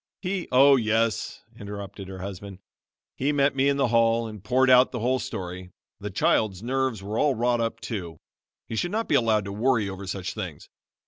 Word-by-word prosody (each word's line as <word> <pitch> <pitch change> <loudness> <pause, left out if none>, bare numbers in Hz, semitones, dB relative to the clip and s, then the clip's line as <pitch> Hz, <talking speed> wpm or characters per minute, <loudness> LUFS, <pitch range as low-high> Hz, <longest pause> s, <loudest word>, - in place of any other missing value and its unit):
He 185 -1 -2
" - - -34
"Oh, 135 +2 +7
yes," 115 -2 0 0.2
interrupted 100 -1 -7
her 95 -1 -8
husband, 100 0 -7 0.6
"he 140 +3 0
met 140 -1 +2
me 135 +1 +3
in 140 - +1
the 135 -3 +2
hall 115 0 +3
and 105 -3 -10
poured 130 +5 +2
out 125 0 +6
the 125 - -4
whole 130 +3 +1
story. 90 -5 -6 0.3
The - - -5
child's 100 -2 +1
nerves 130 -4 -1
were 105 +3 -3
all 145 -3 +2
wrought 120 +1 +1
up, 115 0 -2
too. 90 -8 -6 0.5
He - - -5
should 175 - -1
not 220 +4 -2
be - - 0
allowed 110 -3 +3
to 100 - -5
worry 115 0 +1
over 95 0 -7
such 95 -1 -4
things. 90 -9 -7
115 Hz, 200 wpm, -25 LUFS, 100-130 Hz, 0.6 s, Oh